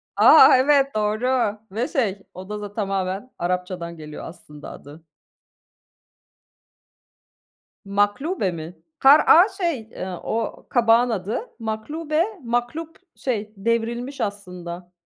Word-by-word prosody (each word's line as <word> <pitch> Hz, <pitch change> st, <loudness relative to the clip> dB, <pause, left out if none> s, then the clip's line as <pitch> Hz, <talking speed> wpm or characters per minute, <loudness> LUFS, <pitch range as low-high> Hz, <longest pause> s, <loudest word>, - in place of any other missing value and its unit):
A! -, -, +8 dB
Evet, 275 Hz, 0 st, +3 dB
doğru 215 Hz, +1 st, 0 dB
ve 225 Hz, +5 st, -2 dB
şey, 205 Hz, -7 st, -1 dB
o 185 Hz, +2 st, -10 dB
da 210 Hz, -1 st, -5 dB
z -, -, -22 dB
tamamen 195 Hz, +2 st, -3 dB
Arapçadan 180 Hz, -1 st, -3 dB
geliyor 150 Hz, -1 st, -9 dB
aslında 150 Hz, -3 st, -11 dB
adı. 150 Hz, +3 st, -13 dB, 2.8 s
Maklube 205 Hz, -, 0 dB
mi? 165 Hz, +1 st, -8 dB, 0.2 s
Kara'a 310 Hz, +7 st, +7 dB
şey, 345 Hz, -8 st, -2 dB
eee, 220 Hz, -4 st, -8 dB, 0.2 s
o 225 Hz, 0 st, -3 dB
kabağın 235 Hz, 0 st, +4 dB
adı. 210 Hz, -1 st, -2 dB, 0.2 s
Maklube, 295 Hz, +9 st, -2 dB, 0.2 s
maklub 245 Hz, +8 st, -3 dB, 0.2 s
şey 215 Hz, -5 st, -3 dB
devrilmiş 235 Hz, +5 st, -2 dB
aslında, 180 Hz, -3 st, -6 dB
215 Hz, 105 wpm, -22 LUFS, 185-255 Hz, 2.8 s, A